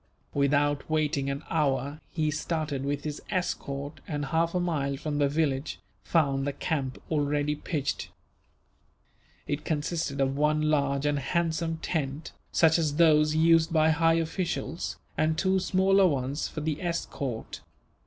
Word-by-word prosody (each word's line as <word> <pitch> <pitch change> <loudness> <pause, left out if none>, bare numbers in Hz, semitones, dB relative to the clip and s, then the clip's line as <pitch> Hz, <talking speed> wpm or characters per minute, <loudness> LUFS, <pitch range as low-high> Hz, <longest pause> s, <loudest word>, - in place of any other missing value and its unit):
Without 145 +1 +1
waiting 150 -3 0
an 140 +2 -3
hour 145 -1 0
he 155 -2 0
started 150 -2 -2
with 145 +1 -2
his 150 -1 -4
escort 145 -6 -3
and, 145 -2 -2
half 165 +4 0
a - - +2
mile 145 -6 -1
from 150 0 -3
the 140 -1 +3
village, 140 -2 -1 0.2
found 140 -4 +1
the 140 - -1
camp 135 -3 -2
already 145 -1 +1
pitched. 145 -1 -3 1.4
It 145 +1 -3
consisted 155 -1 -2
of 135 0 +1
one 150 +1 +2
large 140 -2 +1
and 145 -1 +1
handsome 165 +2 -1
tent, 150 -2 -2 0.2
such 160 0 +4
as 150 -3 0
those 155 -2 +5
used 165 +1 +4
by 160 -1 +4
high 165 +1 +3
officials, 165 -2 -2 0.2
and 155 0 +2
two 190 +1 +2
smaller 190 +1 +4
ones 140 -1 -1
for 155 - -6
the 155 0 -2
escort. 145 -8 -4
150 Hz, 145 wpm, -28 LUFS, 140-165 Hz, 1.4 s, those